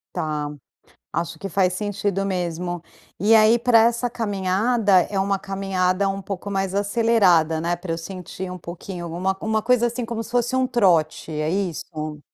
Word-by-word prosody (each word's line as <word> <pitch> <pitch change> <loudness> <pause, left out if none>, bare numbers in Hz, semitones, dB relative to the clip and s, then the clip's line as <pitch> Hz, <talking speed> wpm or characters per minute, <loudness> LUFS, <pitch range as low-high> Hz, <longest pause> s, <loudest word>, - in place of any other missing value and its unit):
Tá. 150 -2 -2 0.6
Acho 170 0 -3
que 195 - -4
faz 185 -1 +2
sentido 200 0 -2
mesmo. 175 -2 -3 0.4
E 210 +5 +4
aí, 220 +2 +6
para 235 -1 +5
essa 235 +1 +2
caminhada, 205 -1 +2
é 195 - -1
uma 195 0 0
caminhada 195 0 0
um 195 0 -3
pouco 195 +1 -5
mais 195 -1 -1
acelerada, 200 -6 +3
né, 170 +1 0
para 175 -1 -5
eu 165 - -3
sentir 185 +1 -7
um 180 - -5
pouquinho. 175 +1 -7
Uma 190 +2 -1
uma 220 0 0
coisa 240 +1 +3
assim 240 +1 -3
como 230 -1 -4
se 230 - -11
fosse 245 +1 0
um 260 0 +2
trote, 170 -9 +2
é 155 +1 -1
isso? 155 -4 -3
195 Hz, 170 wpm, -23 LUFS, 175-220 Hz, 0.6 s, aí